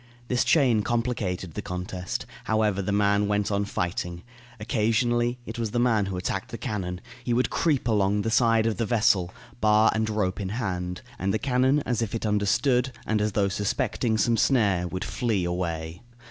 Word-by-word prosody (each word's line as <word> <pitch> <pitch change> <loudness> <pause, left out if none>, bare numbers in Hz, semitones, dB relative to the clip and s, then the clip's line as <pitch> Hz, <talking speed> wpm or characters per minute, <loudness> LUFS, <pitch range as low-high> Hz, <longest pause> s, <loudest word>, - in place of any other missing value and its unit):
This 125 -1 +2
chain 125 -9 +3
complicated 105 -7 -2
the - - -4
contest. 90 0 -4 0.2
However, 105 -3 +1
the 100 - -2
man 100 0 +2
went 105 0 0
on 100 0 0
fighting. 90 -2 -3 0.4
Occasionally, 120 +2 +1
it 115 +1 -6
was 115 -2 -1
the 120 - -1
man 115 -5 +2
who 95 -2 -3
attacked 90 - -3
the - - -6
cannon; 90 -3 -4 0.2
he 120 -1 0
would 125 - +1
creep 145 -7 +1
along 105 -2 +2
the 110 - -1
side 115 -1 +3
of 115 -2 0
the 115 - 0
vessel, 100 -6 +2 0.3
bar 110 0 +4
and 110 0 0
rope 105 -3 -1
in 95 -2 -3
hand; 90 -5 -3 0.2
and 95 +1 0
the 110 - +1
cannon, 130 +3 +2
as 120 -4 -1
if 115 0 -2
it 115 - -3
understood, 125 +5 +2
and 110 -1 0
as 105 -1 0
though 100 -1 +2
suspecting 110 +3 -1
some 115 +1 +2
snare, 100 -8 +2
would 95 +3 -4
flee 110 -7 -1
away. 85 -1 -3
105 Hz, 185 wpm, -26 LUFS, 95-120 Hz, 0.4 s, bar